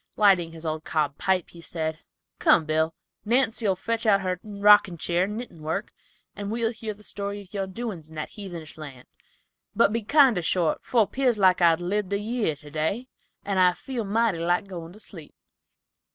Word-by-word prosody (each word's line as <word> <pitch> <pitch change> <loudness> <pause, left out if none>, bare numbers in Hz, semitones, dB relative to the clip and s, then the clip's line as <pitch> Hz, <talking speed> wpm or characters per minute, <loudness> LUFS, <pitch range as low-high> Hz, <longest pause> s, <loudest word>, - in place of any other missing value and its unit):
Lighting 190 -5 +4
his 165 0 -10
old 155 0 -2
cob 150 -3 -1
pipe 185 -3 +1
he 170 - -13
said, 160 -1 -3 0.4
"Come, 160 - +4
Bill, 160 +1 0 0.3
Nancy'll 225 -3 +2
fetch 230 +4 -2
out 200 -2 +5
her 185 -1 -2
rockin' 205 -3 +4
cheer 175 +3 +1
and 210 +2 -5
knittin' 230 -9 -8
work, 160 +6 -3 0.4
and 205 0 -5
we'll 225 +1 0
hear 220 -2 -6
the 210 - -18
story 200 0 -4
of 185 - -20
your 195 -2 -2
doin's 190 -6 -6
in 160 - -13
that 155 - -4
heathenish 170 -7 -9
land, 135 -5 -9 0.7
but 205 - +4
be 230 - 0
kinder 255 - +4
short, 165 0 +1
for 230 -4 +3
pears 255 0 +1
like 185 -2 +4
I'd 170 0 +4
lived 200 +2 -1
a 200 - +1
year 215 -6 -1
today, 155 - -3 0.4
and 195 -2 0
I 180 -1 +5
feel 245 +5 -5
mighty 215 -3 +1
like 175 +3 +1
goin' 170 -3 -8
to 210 - -14
sleep." 165 -7 -10
190 Hz, 185 wpm, -26 LUFS, 165-215 Hz, 0.7 s, out